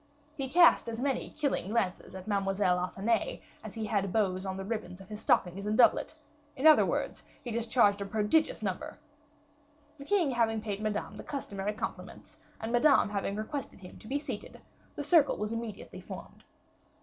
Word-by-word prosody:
He 270 -3 -4
cast 340 -5 +5
as 225 0 -5
many 270 +1 -1
killing 285 -10 -2
glances 205 -5 -1
at 190 -1 -8
Mademoiselle 195 -3 +1
Athenais 195 +5 -1 0.2
as 220 -1 -8
he 220 -1 -3
had 200 -3 0
bows 190 -3 0
of 190 0 -3
ribbons 205 -5 -4
on 195 - -11
his 210 +2 -8
stockings 190 +3 +1
and 215 +1 0
doublet; 255 +5 +4 0.4
in 270 +2 -3
other 310 -1 +8
words - - -2 0.2
he 245 - -5
discharged 225 -3 +2
a - - -2
prodigious 215 +7 +1
number. 190 -3 -4 1.0
The 280 - -9
king 350 -5 +2
having 225 -2 +1
paid 210 -1 -4
Madame 215 -1 -3
the - - -8
customary 205 -7 -4
compliments, 215 - -7 0.2
and 225 +1 -4
Madame 260 -1 +4
having 200 -1 -2
requested 220 +1 -5
him 180 - -12
to - - -13
be 275 - 0
seated, 290 - -6 0.4
the 290 - -4
circle 295 0 +4
was 210 +2 -3
immediately 230 -3 -6
formed. - - -10
215 Hz, 175 wpm, -30 LUFS, 200-255 Hz, 1.0 s, other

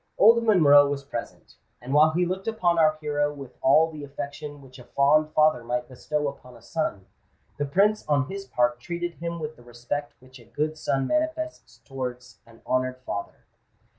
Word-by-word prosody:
Old 230 +2 +6
Monroe 145 -10 +6
was 140 -1 -3
present; 120 -4 -8 0.2
and 125 +3 -6
while 150 +2 +6
he 175 +3 +1
looked 190 +3 -4
upon 180 -7 +1
our 155 -1 +4
hero 145 -1 0
with 140 -3 -10
all 155 +5 +4
the 150 -2 -8
affection 145 +1 -7
which 135 -1 -15
a - - -11
fond 150 +4 +3
father 155 -6 +4
might 120 +1 -2
bestow 150 +3 -3
upon 125 -3 -9
a - - -19
son, 135 - -3 0.5
the 145 - -1
Prince 200 +9 +2
on 145 -3 +2
his 195 +3 -6
part 120 0 +1
treated 175 +5 -4
him 170 0 -4
with 155 0 -5
the 120 - -17
respect 120 +5 -5
which 130 0 -16
a 120 - -17
good 150 +7 -2
son 135 -3 -1
manifests 315 - -2
towards 125 -4 -6
an 115 -1 -19
honoured 130 0 0
father. 100 +2 -6
145 Hz, 185 wpm, -25 LUFS, 130-160 Hz, 0.5 s, Old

